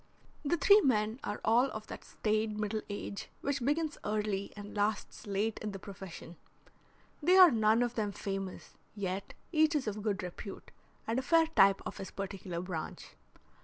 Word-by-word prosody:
The 315 +4 +1
three 405 +5 +7
men 220 - +1
are 205 - -3
all 235 +3 +5
of 215 -5 -6
that - - -8
staid 215 0 -1
middle 215 +1 -1
age 200 0 -5
which 280 -2 -1
begins 295 +3 0
early 210 -2 -1
and 205 +1 -8
lasts 210 +1 -1
late 205 +2 -1
in 210 -1 -4
the - - -4
profession. 185 -3 -9 0.8
They 360 +5 +5
are 365 -3 +10
none 220 0 +4
of 240 -1 -1
them 215 -4 -1
famous, 195 -1 -5 0.2
yet 195 -1 -4 0.2
each 315 -1 +4
is 290 - +1
of 210 -1 -3
good 200 -3 -1
repute, 180 +2 -8 0.3
and 230 +3 0
a - - -1
fair 325 +5 +4
type 195 -11 +4
of - - -5
his 195 - -6
particular 190 -3 -5
branch. 180 -4 -6
215 Hz, 170 wpm, -32 LUFS, 195-250 Hz, 0.8 s, are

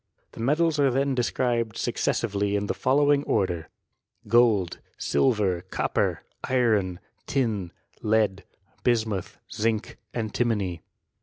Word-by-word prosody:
The - - -13
metSs 150 +6 +2
are 140 -1 +5
then 135 +2 +1
described 120 -3 0
successively, 100 -2 0
in 100 0 0
the - - -1
following 145 +2 +3
order 90 -5 +1
x - - -27 0.6
Gold, 110 -6 +3 0.2
silver, 105 -9 +1
copper, - - 0 0.2
iron, 110 -8 +1 0.3
tin, 110 -10 -1 0.3
lead, 105 -3 +1 0.4
bismuth, 110 -6 0
zinc^ 110 0 -1 0.2
^timony. 110 -6 -1
110 Hz, 105 wpm, -26 LUFS, 100-125 Hz, 0.6 s, are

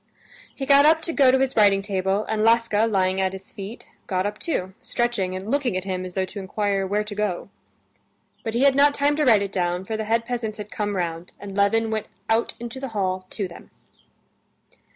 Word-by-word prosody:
He 270 - -4
got 280 +1 +6
up 320 +1 +4
to 335 - -1
go 275 -4 +5
to 260 - +5
his 265 0 0
writing 200 -2 +4
table, 195 0 0
and 215 -1 -1
Laska, 230 -1 +3
lying 190 -3 +1
at 190 0 0
his 190 0 -10
feet, 205 +4 -8 0.2
got 185 -1 0
up 205 +1 -3
too, 190 - -2
stretching 220 -6 -1
and 190 +4 -5
looking 265 -8 +1
at 185 - -3
him 185 -1 -3
as 180 - -9
though 190 -1 +1
to 200 - -8
inquire 195 0 -1
where 205 +2 0
to 210 0 -7
go. 205 -3 -2 0.9
But 225 0 -4
he 245 - +2
had 280 -1 +6
not 285 +1 +4
time 285 +1 +2
to 305 - +2
write 220 -5 +5
it 200 - -4
down, 180 -1 -1
for 220 - -3
the 220 0 -3
head 230 +1 +1
peasants 230 -3 -3
had 210 -1 -8
come 205 -1 -2
round, 170 -1 -3
and 200 -1 -8
Levin 220 +3 +2
went 215 -1 -2 0.2
out 225 +1 +1
into 240 +2 -6
the 270 - -4
hall 185 -1 -1
to 200 -3 -3
them. 170 - -13
210 Hz, 220 wpm, -24 LUFS, 190-235 Hz, 0.9 s, got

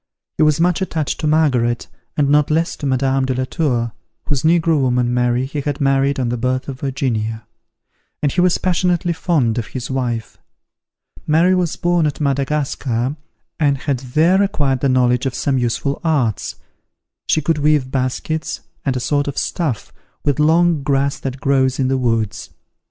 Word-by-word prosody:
He - - 0
was 155 0 +4
much 175 +2 +2
attached 160 -6 -2
to 155 - -1
Margaret, 130 -7 +2 0.3
and 145 -2 +3
not 145 0 +3
less 165 +2 +1
to 145 - -3
Madame 135 0 +1
de 130 -1 -1
la 130 - 0
Tour, 125 -7 -1 0.3
whose 140 -3 -1
negro 165 -2 +3
woman, 125 -1 +1
Mary, 125 +1 +1
he 145 +2 -4
had 145 0 -3
married 135 0 +2
on 125 -2 0
the 120 - -1
birth 130 +2 -1
of 135 -2 -6
Virginia; 115 -5 -2 0.8
and 145 - +2
he 180 - +1
was 180 -1 +3
passionately 175 -1 +1
fond 140 -9 +1
of 110 - -4
his 125 0 -6
wife. 120 -4 -3 0.9
Mary 165 +4 +4
was 180 -3 0
born 175 -2 +1
at 145 - -4
Madagascar, 140 -3 -1 0.4
and 145 -3 +2
had 135 -1 -2
there 155 +9 +2
acquired 145 -9 +1
the 140 - +1
knowledge 125 0 +2
of 130 - -4
some 135 -2 0
useful 125 +3 -1
arts. 140 - 0 0.7
She - - +3
could 155 +1 0
weave 145 -3 +2
baskets, 135 +4 -2 0.2
and 135 -2 0
a - - -1
sort 145 +3 0
of 140 - -4
stuff, 150 - -2 0.3
with 145 -2 +1
long 165 +1 +3
grass 140 0 0
that 135 0 -5
grows 135 -2 +2
in 130 -1 +1
the 135 - +1
woods. 115 -4 -1
140 Hz, 175 wpm, -19 LUFS, 130-155 Hz, 0.9 s, was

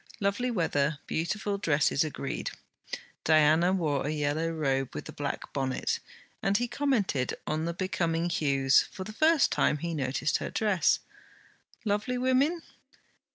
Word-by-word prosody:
Lovely 205 +5 0
weather, 155 -8 +1
beautiful 200 +5 -2
dresses: 150 -5 +2
agreed. 70 - -4 0.7
Diana 155 +3 +5
wore 155 -7 0
a - - -1
yellow 155 +2 0
robe 135 - -1
with 75 - -5
a - - -7
black - - -5
bonnet, 130 -1 -1 0.4
and 195 +1 +2
he 245 +2 0
commented 235 - 0
on 155 +1 -1
the 170 - -2
becoming 170 -3 0
hues; 140 -5 +3
for 190 - -6
the 215 +3 -8
first 315 +4 +4
time, 150 - +2
he 170 +3 -3
noticed 140 0 0
her - - -4
dress! 210 -5 +2 0.8
Lovely 215 +5 0
women? 265 +7 +2
165 Hz, 140 wpm, -29 LUFS, 145-210 Hz, 0.8 s, Diana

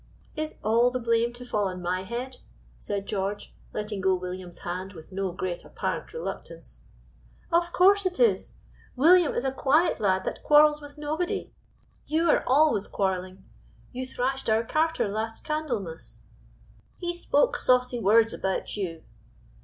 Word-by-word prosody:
"Is 310 0 -3
all 230 +3 +4
the 250 - -2
blame 230 0 +1
to 245 +1 -10
fall 210 -4 0
on 185 -1 -5
my 180 +1 -1
head?" 240 +6 -5 0.4
said 195 - -4
George, 200 0 -3 0.2
letting 210 -2 -4
go 190 0 +3
William's 180 -1 -6
hand 185 +3 -5
with 160 0 -13
no 195 -1 -2
great 180 0 -4
apparent - - -4
reluctance. 480 - -7 0.7
"Of 345 +1 +2
course 400 +3 +5
it 365 - -4
is! 480 -2 +2 0.4
William 330 +4 +5
is - - 0
a 265 - 0
quiet 290 +6 +2
lad 190 -3 +1
that - - -4
quarrels 300 0 +5
with 290 0 -12
nobody; 310 +4 -3 0.5
you 320 +2 +1
are - - +2
always 270 -6 +3
quarreling; 185 -1 -2 0.5
you 255 0 -5
thrashed 265 0 -2
our 220 +1 +3
carter 315 +2 +1
last 220 +2 -4
Candlemas." 240 - -4 0.8
"He 350 -1 -3
spoke 475 +7 +2
saucy 250 - +2
words 225 +2 +4
about 190 0 -2
you." 170 -6 -4
235 Hz, 150 wpm, -27 LUFS, 190-300 Hz, 0.8 s, course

